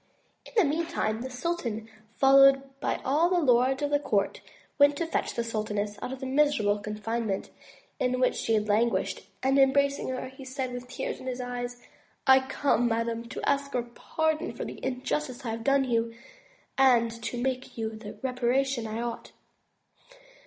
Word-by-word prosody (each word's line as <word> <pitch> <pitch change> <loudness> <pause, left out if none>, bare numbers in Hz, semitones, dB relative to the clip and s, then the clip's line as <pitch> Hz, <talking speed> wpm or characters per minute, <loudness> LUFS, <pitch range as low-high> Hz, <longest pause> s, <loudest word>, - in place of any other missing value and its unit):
In - - -15
the 420 - +6
meantime, 285 -8 -1
the 260 - -4
sultan, 250 -5 -3 0.3
followed 275 0 +7 0.2
by - - -1
all 305 +6 +3
the 360 -1 +3
lords 265 -1 +3
of 290 - 0
his 290 0 +2
court, 200 -7 0 0.4
went 285 0 +6
to 335 - -1
fetch 325 - -2
the 235 - 0
sultaness 210 -2 -3
out - - -4
of 265 - -6
the - - -3
miserable 265 -7 +2
confine 215 +2 -3
ment 195 -1 -3 0.5
in 255 0 +1
which 255 - +3
she 225 - 0
had 210 0 0
languished, 225 +3 +1 0.2
and 270 +1 +3
embracing 280 +1 +3
her, 255 0 -3
he 265 +1 -12
said 260 -1 -4
with 245 0 -6
tears 260 - -4
in 260 - -9
his 255 0 -3
eyes: 245 -1 -5 0.4
"I 265 0 +8
come, 265 -2 +1
madame, 230 0 -1
to - - -4
ask 280 -1 0
your 245 - +1
pardon 315 +6 -2
for - - -5
the - - -8
injustice 260 +1 -3
I 225 - -1
have 225 0 -5
done 275 +1 +3
you, 230 -2 0 0.6
and 240 -4 +5
to 235 +2 -4
make 255 0 -3
you 220 -1 -2
the 220 -1 -9
reparation 255 -1 0
I 220 +2 -3
ought. 240 -1 -6
255 Hz, 180 wpm, -28 LUFS, 230-275 Hz, 0.6 s, I